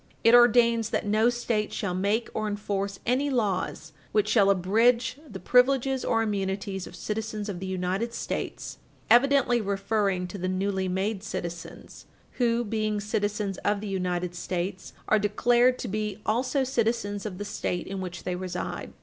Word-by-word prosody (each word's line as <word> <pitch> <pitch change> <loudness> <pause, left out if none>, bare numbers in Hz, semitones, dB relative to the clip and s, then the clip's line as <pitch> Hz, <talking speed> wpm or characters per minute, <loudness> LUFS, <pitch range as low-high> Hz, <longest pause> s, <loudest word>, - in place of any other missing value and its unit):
It 230 - +6
ordains 235 -2 +5
that - - -1
no 215 +3 +3
State 235 -3 -1
shall 200 -3 -2
make 205 +5 0
or 215 - -2
enforce 200 -1 -3
any 260 +4 +1
laws 195 - -1 0.2
which 210 -1 +3
shall 210 -2 +4
abridge 230 +8 +2
the 195 -4 -7
privileges 260 +2 +3
or 225 0 +1
immunities 195 -2 -2
of - - -11
citizens 215 -1 -4
of 185 -3 -4
the 190 - -5
United 190 +5 -2
States - - -4 0.3
(evidently 245 -1 +5
referring 195 -2 0
to 200 - -7
the 185 - -2
newly 190 0 -1
made 190 +2 -1
citizens, 175 -4 -7 0.3
who, 235 -1 +2
being 215 -1 -1
citizens 205 -1 -2
of 205 0 0
the 210 - -6
United 180 -2 -2
States, 180 +1 -4
are 215 - +4
declared 240 +5 +3
to - - -5
be 210 0 -3
also 255 +5 +1
citizens 230 -5 -1
of 200 -4 -5
the 205 - -5
State 180 -3 -3
in 195 0 -5
which 175 -2 -6
they 180 - -2
reside). 180 0 -5
210 Hz, 160 wpm, -27 LUFS, 190-230 Hz, 0.3 s, It